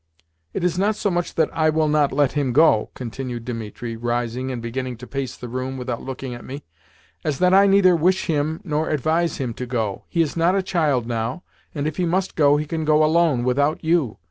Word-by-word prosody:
"It - - -2
is 180 0 0
not 205 +2 +2
so 205 - -1
much 175 0 -2
that 160 -2 +2
I 155 -1 +3
WILL 155 0 +2
NOT 150 -2 +2
LET 140 0 +2
HIM 140 -4 -1
go," 140 -7 +4
continued 125 -1 -6
Dimitri, 115 -1 -5
rising 120 +2 -2
and 125 -2 -4
beginning 125 +1 -4
to 125 - -10
pace 135 -1 -4
the 125 - -7
room 130 +2 -4
without 125 -2 -4
looking 130 -1 -6
at 120 - -9
me, 140 +2 -8 0.6
"as 150 -3 -1
that 180 0 +3
I 200 +1 +6
neither 195 -2 +5
wish 180 +4 +2
him 155 0 -1
nor 155 -2 -1
advise 160 +3 0
him 125 -4 -3
to 125 +2 -6
go. 110 -5 -2
He 170 -2 +2
is 150 - -4
not 170 +3 +2
a 195 - +1
child 155 -10 +1
now, 115 +6 -3 0.3
and 145 -1 -2
if 155 - -3
he 180 - +1
must 185 +3 -1
go 145 -2 +4
he 150 - -2
can 160 +1 -3
go 155 0 +4
alone 155 -5 +2
without 140 +6 +1
you. 160 -8 +1
145 Hz, 220 wpm, -22 LUFS, 125-165 Hz, 0.6 s, I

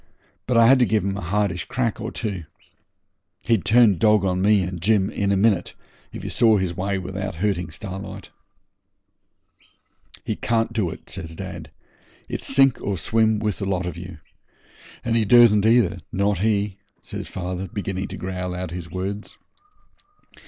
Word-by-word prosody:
But 125 -1 +2
I 115 - +7
had 130 +3 +6
to 125 - +5
give 110 -3 +1
him 100 0 -1
a 100 - -5
hardish 95 -1 -1
crack 120 -3 -2
or 110 +2 -4
two. 100 -8 -4 1.0
He'd 110 -7 +1
turn 110 -5 +5
dog 105 -2 +4
on 90 -1 0
me 100 0 +4
and 90 -1 -5
Jim, 100 0 +2
and - - -14
in 100 -1 +1
a 100 - +2
minute, 100 -3 +1 0.4
if - - -8
he - - -4
saw 110 -3 +4
his 95 -3 -2
way 100 +2 -1
without 95 +1 -5
hurting 90 -2 -1
Starlight.' 95 +3 -7 1.9
'He - - -2
can't 115 0 0
do 105 -6 0
it,' - - -10
says 80 -4 -7
dad; 85 -5 -7 0.6
'it's - - -4
sink 135 -2 +4
or 100 -1 -2
swim 110 +4 +2
with 105 -1 -2
the 100 - -2
lot 90 -2 -1
of 90 - -4
you. 85 0 -9 0.9
And 115 -1 +1
he 115 - +3
dursn't 110 -1 +6
either, 115 -6 +3
not 100 -1 0
he,' 100 -1 0 0.2
says - - -6
father, 90 +1 -4
beginning 95 0 -4
to - - -7
growl 90 -1 -4
out 90 -1 -5
his 85 -1 -6
words. 95 +4 -5
100 Hz, 175 wpm, -23 LUFS, 90-110 Hz, 1.9 s, I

